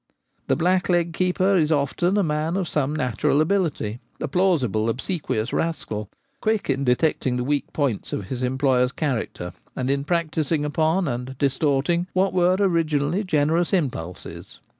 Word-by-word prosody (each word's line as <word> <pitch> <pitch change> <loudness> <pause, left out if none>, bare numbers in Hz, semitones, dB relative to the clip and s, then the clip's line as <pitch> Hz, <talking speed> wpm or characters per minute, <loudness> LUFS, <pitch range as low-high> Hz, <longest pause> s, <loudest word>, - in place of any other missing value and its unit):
The - - +3
blackleg 175 0 +2
keeper 185 +2 +1
is 165 -4 +3
often 160 +6 +1
a 205 - +3
man 155 +2 -1
of 185 -3 -1
some 150 -1 0
natural 135 0 +1
ability 155 - 0
— - - -40
a - - -2
plausible, 135 - +1
obsequious 130 - -2
rascal, 110 -11 -2 0.3
quick 215 -8 +1
in 135 +1 -1
detecting 125 -1 +1
the 125 - -1
weak 145 +2 -1
points 135 -9 -1
of 100 - -3
his 130 -1 -4
employer's 130 0 +2
cha 150 +1 -1
racter, 90 -6 -5 0.2
and 130 +1 -1
in 140 0 0
practising 160 -2 0
upon 160 +4 +1
and 125 +1 -4
distorting 145 +5 +1
what 190 +1 +2
were 180 0 +3
originally 165 -1 +1
generous 160 0 +1
impulses. 105 - -3
150 Hz, 155 wpm, -23 LUFS, 130-175 Hz, 0.3 s, The